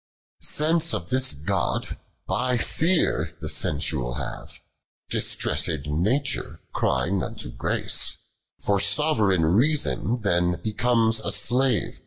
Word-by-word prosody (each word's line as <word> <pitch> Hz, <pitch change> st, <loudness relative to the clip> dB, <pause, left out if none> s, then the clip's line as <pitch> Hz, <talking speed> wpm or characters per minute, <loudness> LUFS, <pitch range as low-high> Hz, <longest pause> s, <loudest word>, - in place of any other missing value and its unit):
Stance 165 Hz, +2 st, +1 dB
of 85 Hz, -, -6 dB
this 130 Hz, 0 st, +4 dB
(joil, 75 Hz, +1 st, -1 dB, 0.4 s
by 125 Hz, +1 st, 0 dB
fear, 115 Hz, -, 0 dB
the 80 Hz, -, -6 dB
sensual 75 Hz, -5 st, -1 dB
have, 65 Hz, -2 st, -7 dB, 0.5 s
J)istressed 80 Hz, -5 st, 0 dB
Nature, 105 Hz, -, -1 dB
crying 95 Hz, +1 st, 0 dB
unto -, -, -5 dB
Grace; -, -, -1 dB, 0.4 s
Fer 100 Hz, -1 st, 0 dB
soveroiga 100 Hz, -, +4 dB
Iteason 120 Hz, -, +1 dB
then 90 Hz, -3 st, +1 dB
becomes 115 Hz, 0 st, +1 dB
a 100 Hz, -, -3 dB
slave. 120 Hz, +4 st, +2 dB
100 Hz, 105 wpm, -24 LUFS, 80-125 Hz, 0.5 s, this